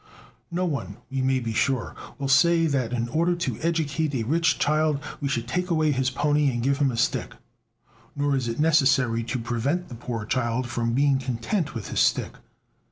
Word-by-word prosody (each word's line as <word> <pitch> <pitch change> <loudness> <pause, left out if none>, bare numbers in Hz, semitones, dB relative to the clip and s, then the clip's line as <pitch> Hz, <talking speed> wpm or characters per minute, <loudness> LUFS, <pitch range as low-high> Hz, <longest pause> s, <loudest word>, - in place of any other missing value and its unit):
No 180 +1 -1
one, 150 -6 -3
we 135 0 -1
may 130 0 +2
be 115 -2 -3
sure, 125 +1 0 0.2
will 140 - -3
say 165 +5 +4
that 135 -6 0
in 120 -1 -1
order 170 +6 +1
to 170 - -3
educate 160 -3 0
a 115 - 0
rich 165 +6 +2
child 155 -1 +1 0.2
we 145 - -2
should 120 -4 -2
take 180 +7 -2
away 155 -3 +2
his 130 -1 +1
pony 145 +2 +2
and 120 -2 -2
give 140 +2 +1
him 140 -2 +3
a 120 - -4
stick. 120 - -1 0.8
Nor 145 -1 +1
is 130 -3 -1
it 115 +3 -3
necessary 135 -7 +3
to 125 - -2
prevent 125 +9 -2
the - - -8
poor 115 -2 -5
child 120 +1 -1
from 120 -1 -1
being 140 +1 +3
content 130 - -2
with 110 -5 -5
his - - -1
stick. - - +2
135 Hz, 195 wpm, -25 LUFS, 120-155 Hz, 0.8 s, say